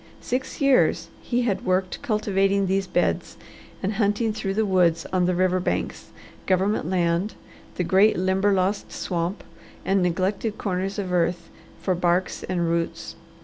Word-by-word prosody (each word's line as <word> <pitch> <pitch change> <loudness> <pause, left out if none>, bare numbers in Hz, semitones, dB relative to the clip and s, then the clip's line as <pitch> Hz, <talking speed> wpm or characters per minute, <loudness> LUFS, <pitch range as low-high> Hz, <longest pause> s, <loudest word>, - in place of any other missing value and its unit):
Six 255 +2 -3
years 275 -2 +3
he 245 0 0
had 210 -5 -1
worked 185 0 0
cultivating 200 -5 +1
these 195 0 0
beds, - - -1 0.5
and 195 +3 0
hunting 210 +1 +1
through 195 -2 -3
the 220 +1 +2
woods 175 -4 +2
on 180 -1 +2
the 180 - +1
river 185 0 +2
banks, 180 - -3 0.4
government 190 -1 +1
land, 175 +2 0 0.4
the 180 - -1
great 195 +5 +4
Limberlost 190 +1 +1
Swamp, 175 +2 -3 0.4
and 195 0 +2
neglected 190 +5 -1
corners 190 0 -2
of 190 -3 -3
earth 175 -1 0 0.3
for 185 - +1
barks 175 +1 0
and 175 -2 -1
roots. 165 0 -2
190 Hz, 145 wpm, -24 LUFS, 180-205 Hz, 0.5 s, great